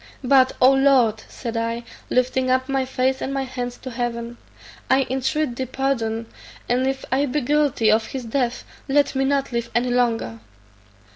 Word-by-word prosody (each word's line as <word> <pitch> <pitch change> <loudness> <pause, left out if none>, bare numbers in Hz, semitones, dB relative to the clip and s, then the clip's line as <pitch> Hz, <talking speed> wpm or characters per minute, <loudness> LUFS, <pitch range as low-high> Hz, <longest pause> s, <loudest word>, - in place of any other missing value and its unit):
But, 260 0 +4
O 255 +1 +7
Lord!" 265 -5 +3
said 235 -2 -6
I, 230 +1 -2 0.3
lifting 255 +1 +1
up 260 0 +2
my 270 -1 0
face 260 0 0
and 270 - -2
my 275 0 -1
hands 245 -1 -5
to 260 - -6
heaven, 235 0 -4 0.5
"I 265 0 +4
intreat 265 +1 -1
thy 260 - -2
pardon, 235 -4 -1 0.4
and 250 +2 +1
if 270 0 -2
I 275 +2 +2
be 290 +3 -1
guilty 285 -4 +2
of 220 +1 +2
his 260 -3 -6
death, 245 +1 -1 0.3
let 285 +1 +3
me 270 0 +1
not 275 -1 0
live 235 -1 -2
any 245 +1 +1
longer." 230 - 0
255 Hz, 170 wpm, -22 LUFS, 240-270 Hz, 0.5 s, O